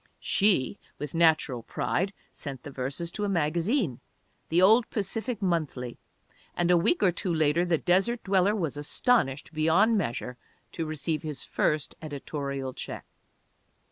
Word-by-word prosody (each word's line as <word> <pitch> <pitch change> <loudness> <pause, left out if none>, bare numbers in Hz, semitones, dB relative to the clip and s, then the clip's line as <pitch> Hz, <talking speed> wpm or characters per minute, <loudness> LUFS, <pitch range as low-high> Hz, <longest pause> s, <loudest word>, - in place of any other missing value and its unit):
She, 200 -4 +2 0.2
with 150 -2 -6
natural 155 -7 +3
pride, 190 - -1 0.2
sent 135 -4 -7
the 145 - -8
verses 135 +6 -4
to 210 - -4
a 205 - 0
magazine, 170 - 0 0.5
the 165 - +3
old 220 +6 +6
Pacific 220 +2 -3
Monthly, 150 -9 -2 0.6
and 175 0 +2
a - - +6
week 210 - +2
or 185 - +5
two 175 +1 -2
later 160 +1 +2
the 175 -2 +2
desert 195 +9 +1
dweller 195 +1 +3
was 165 -8 -2
astonished 150 - +1
beyond 180 +8 +3
measure 125 -4 -3 0.3
to 165 -2 -4
receive 155 0 -2
his 150 -3 -5
first 150 -1 0
editorial 140 -3 -4
check. - - -7
165 Hz, 140 wpm, -28 LUFS, 145-195 Hz, 0.6 s, old